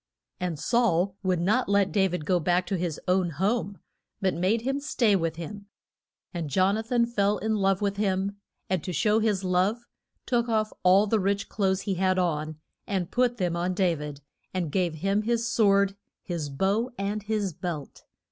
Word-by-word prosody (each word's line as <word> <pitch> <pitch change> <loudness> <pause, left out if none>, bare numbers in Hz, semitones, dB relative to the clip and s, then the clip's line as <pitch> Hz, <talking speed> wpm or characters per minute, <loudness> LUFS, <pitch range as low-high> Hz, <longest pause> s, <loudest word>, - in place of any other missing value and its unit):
And 180 -3 -2
Saul 195 - +1
would 185 -3 +1
not 205 +7 +1
let 200 -2 +3
Da 190 +2 +3
vid 175 -4 -4
go 180 +2 +2
back 175 +2 +1
to 195 - -2
his 175 -4 -2
own 180 -1 +2
home, 200 - -1 0.4
but 190 -1 +1
made 190 +7 +1
him 270 +3 -1
stay 240 -7 +2
with 165 -3 -1
him. 200 +5 -8 0.7
And 170 -4 -3
Jon 185 +7 +3
a 220 - -1
than 235 +1 +1
fell 210 -3 +1
in 220 0 -1
love 195 0 +1
with 200 0 0
him, 200 0 0 0.3
and 185 -4 -1
to 180 - -4
show 215 +4 +2
his 210 -4 0
love, 190 +6 +1 0.4
took 240 -1 +1
off 215 -1 0
all 190 +3 +5
the 215 +1 +1
rich 200 +1 -1
clothes 190 -2 0
he 200 - -2
had 185 0 +1
on 155 -3 -1 0.3
and 190 -5 -2
put 245 -1 +1
them 175 -4 0
on 180 +1 -1
Da 185 -2 +2
vid, 150 -2 -7 0.3
and 175 -5 -1
gave 175 -1 0
him 195 +6 0
his 230 +1 0
sword, 200 -3 +3 0.3
his 165 -5 -4
bow, 195 - 0
and 200 +2 -2
his 205 -3 -2
belt. 170 -4 -6
195 Hz, 190 wpm, -27 LUFS, 180-210 Hz, 0.7 s, all